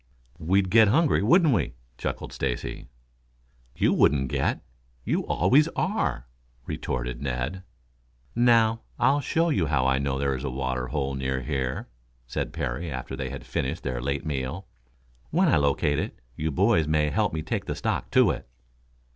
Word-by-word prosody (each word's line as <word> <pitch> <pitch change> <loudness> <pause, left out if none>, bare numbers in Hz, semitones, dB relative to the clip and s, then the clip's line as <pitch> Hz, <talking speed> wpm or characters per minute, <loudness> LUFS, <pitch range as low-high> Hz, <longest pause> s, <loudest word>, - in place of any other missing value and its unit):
"We'd 95 +3 +1
get 110 -1 +7
hungry, 145 - +3
wouldn't 155 - +5
we?" 80 - 0 0.2
chuckled - - -4
Stacy. - - -3 0.9
"You - - +2
wouldn't 65 -2 +3
get. - - 0 0.4
You - - 0
always 130 - +4
are," 190 - -1 0.4
retorted 60 0 -3
Ned. 70 +7 -3 0.7
"Now, 115 -2 +4 0.2
I'll 140 +2 +3
show 165 +5 +1
you 95 - +1
how 70 -4 +1
I 65 0 +3
know 70 -1 -1
there 70 0 0
is 65 +1 -4
a 70 - -2
water 65 -1 -2
hole 70 0 -2
near 65 -1 -2
here," 65 -2 -2 0.4
said - - -3
Parry 75 +8 -3
after 65 -3 -5
they 65 - -4
had 70 0 -7
finished 75 +6 -3
their 65 -2 -3
late 70 +2 -2
meal. 70 +5 -3 0.6
"When 180 +4 +3
I 145 - +4
locate 70 +1 +1
it, - - -4 0.2
you 80 +4 -2
boys 90 +1 +3
may 75 -1 +2
help - - +1
me 80 0 -3
take - - -3
the - - -3
stock - - -2
to - - +5
it." - - -7
75 Hz, 165 wpm, -26 LUFS, 65-100 Hz, 0.9 s, get